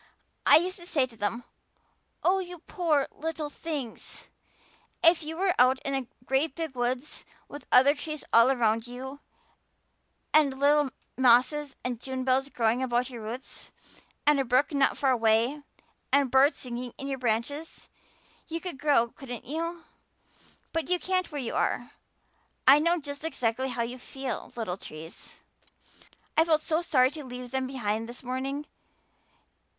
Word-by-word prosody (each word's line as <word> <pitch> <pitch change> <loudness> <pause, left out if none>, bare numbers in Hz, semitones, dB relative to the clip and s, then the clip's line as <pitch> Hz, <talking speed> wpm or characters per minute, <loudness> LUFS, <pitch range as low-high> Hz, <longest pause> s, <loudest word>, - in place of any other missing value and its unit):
I - - +9
used 365 +4 -1
to 345 -1 -11
say 280 -7 +2
to 245 -3 -15
them, 220 +3 -2 0.8
'Oh, 380 +2 +3
you 360 -1 -6
poor 315 -4 0
little 310 -1 -4
things! 290 -8 -6 0.7
If 335 0 +6
you 320 +1 -6
were 375 0 +2
out 255 +1 +6
in 275 - -1
a 265 -3 -2 0.2
great 270 +3 +1
big 325 -4 -4
woods 250 +3 -2 0.2
with 290 - -10
other 265 +3 +7
trees 305 0 -5
all 230 +2 +7
around 230 -3 +1
you 265 +3 -7 1.1
and 285 -4 +5
little 290 0 +4 0.3
mosses 265 +4 +4
and 245 -2 -3
June 260 -1 -3
bells 265 +1 +1
growing 235 -1 +1
over 240 -2 +2
your 245 -2 -8
roots 230 +4 -8 0.5
and 295 -1 +5
a - - +3
brook 255 +5 +2
not 280 -1 +2
far 270 -2 +2
away 230 +4 +2 0.5
and 280 -3 +3
birds 270 +3 +5
singing 245 -1 -6
in 275 - -4
you 270 -1 -3
branches, 250 +7 -2 0.6
you 330 0 -3
could 345 -6 -6
grow, 285 -6 +3
couldn't 245 -3 -8
you? 335 +4 -4 0.9
But 325 +1 -2
you 360 - +3
can't 370 -1 -1
where 295 - -4
you 235 - -4
are. 245 - -1 0.8
I 275 +3 +9
know 335 +3 +2
just 285 -1 -7
exactly 260 -4 -1
how 240 -2 -1
you 245 +2 -6
feel, 265 0 -6
little 220 -6 -3
trees.' 160 -1 -10 0.9
I 320 - +6
felt 320 -2 +2
sorry 310 -6 +2
to 300 0 -8
leave 250 -1 -8
them 265 -1 -1
behind 225 -3 -2
this 245 - -8
morning. 265 +3 -3
270 Hz, 155 wpm, -28 LUFS, 245-305 Hz, 1.1 s, I